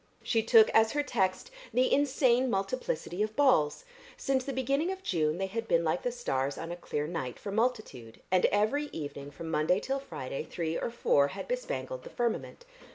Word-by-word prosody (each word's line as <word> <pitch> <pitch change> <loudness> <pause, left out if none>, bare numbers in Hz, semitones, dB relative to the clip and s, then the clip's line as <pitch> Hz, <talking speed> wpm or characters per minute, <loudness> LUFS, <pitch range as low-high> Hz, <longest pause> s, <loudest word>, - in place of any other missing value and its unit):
She 225 - +2
took 225 0 +6
as 220 0 +4
her 290 0 +1
text 195 - -1 0.2
the 255 +1 +2
insane 260 -3 +3
multiplicity 195 -3 -2
of 215 0 -1
balls; 255 - +3 0.3
since 265 -1 0
the 275 - -4
beginning 275 +6 0
of 380 0 -7
June 155 - 0
they 195 - -1
had 225 +4 -4
been 170 0 +3
like 160 +2 0
the 245 - -1
stars 140 - -2
on 165 +1 -5
a - - -3
clear 150 -4 -3
night 155 -7 -4
for 200 - -6
multitude, 215 - -2
and 185 -1 +4
every 220 +9 +1
evening 145 - -6
from 160 +2 -7
Monday 165 +4 +2
till 270 +5 -2
Friday 135 - -5
three 165 0 -3
or - - -2
four 145 -11 +3
had 190 +7 -7
bespangled - - -3
the - - -9
firmament. 240 - -3
215 Hz, 190 wpm, -30 LUFS, 165-260 Hz, 0.3 s, took